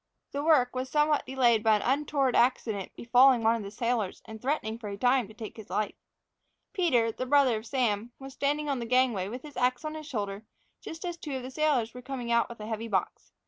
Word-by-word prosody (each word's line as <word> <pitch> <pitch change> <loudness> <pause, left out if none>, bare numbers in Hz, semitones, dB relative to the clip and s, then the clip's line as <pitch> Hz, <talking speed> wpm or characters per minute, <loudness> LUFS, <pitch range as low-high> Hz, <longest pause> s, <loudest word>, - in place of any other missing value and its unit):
The 285 +1 -3
work 275 -6 +3
was 255 +1 -3
somewhat 300 0 +2
delayed 245 -4 +3
by 220 0 +4
an 210 - -1
untoward 275 -1 +1
accident 225 -5 +1
befalling 245 +1 +5
one 225 +1 +4
of 230 - -4
the 200 - -6
sailors, 230 -2 -2
and 220 -1 -10
threatening 240 -5 -2
for 220 - -7
a 200 - -6
time 250 +1 +2
to 215 - -13
take 220 -2 -8
his 220 - -11
life. 215 - -1 0.8
Peter, 250 - +2
the 255 +3 -5
brother 270 -4 +4
of 220 +2 -8
Sam, 235 -3 0
was 270 0 -10
standing 295 +2 -1
on 275 -3 -1
the 235 - -4
gangway, 245 -6 +2
with 245 +5 -7
his 295 -2 -11
ax 250 +3 +1
on 310 - -3
his 310 -1 -8
shoulder, 205 -5 -4 0.4
just 325 +3 -8
as 345 -1 -4
two 295 -4 -5
of 260 - -4
the 255 - -7
sailors 265 -6 +1
were 250 - -9
coming 250 -2 -5
out 235 0 +3
with 235 - -10
a 210 - -6
heavy 225 +1 -4
box. 190 -5 -2
245 Hz, 230 wpm, -28 LUFS, 220-275 Hz, 0.8 s, befalling